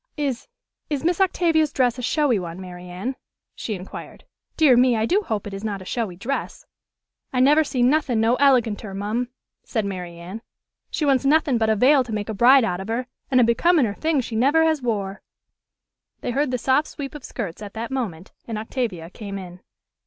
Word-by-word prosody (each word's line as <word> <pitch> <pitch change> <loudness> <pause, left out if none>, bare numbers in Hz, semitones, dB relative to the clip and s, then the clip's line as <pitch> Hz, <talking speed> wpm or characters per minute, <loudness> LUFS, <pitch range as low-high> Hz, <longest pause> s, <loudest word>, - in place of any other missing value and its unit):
"Is 275 -5 -2 0.4
is 290 -2 -2
Miss 345 +3 +1
Octavia's 330 -5 +2
dress 250 -3 +1
a - - -3
showy 265 -3 +2
one, 170 0 -6
Mary 180 -1 -9
Anne?" 195 +9 -4 0.4
she 215 - -4
inquired. 185 0 -9 0.3
"Dear 300 -6 +6
me, 250 0 +4
I 220 - +1
do 385 - +2
hope 220 - -3
it 205 - -6
is 195 +1 -6
not 205 -3 -3
a 185 - -11
showy 215 -4 -3
dress!" 250 +10 -4 0.7
"I 255 - 0
never 295 +5 +5
see 260 -4 -1
nothin' 260 -3 +2
no 225 +2 +3
eleganter, 235 -7 +2
mum," 215 +5 -2 0.4
said 220 -3 -2
Mary 180 -3 -5
Anne: 180 +6 -8 0.5
"she 310 - -1
wants 275 -2 +3
nothin' 280 -3 +3
but 220 -1 +2
a 220 - +3
veil 265 +5 +5
to 240 - -9
make 210 -1 -3
a - - -2
bride 250 +5 +6
out 180 -5 -1
of 190 - -6
her 235 +3 -2 0.2
an' 255 - +4
a - - +6
becominer 235 - +3
thing 315 +3 0
she 230 -2 -6
never 280 +8 +4
has 315 -3 +2
wore." 205 -5 -2 1.0
They - - -2
heard 280 +3 +1
the 250 - 0
soft 265 +5 +2
sweep 275 -2 -7
of 295 -3 -9
skirts 200 -6 -6
at 205 0 -8
that 230 +3 -4
moment, 200 -10 -4 0.2
and 225 -2 -3
Octavia 215 -7 -4
came 200 -2 -7
in. 180 -2 -9
240 Hz, 205 wpm, -23 LUFS, 205-275 Hz, 1.0 s, Dear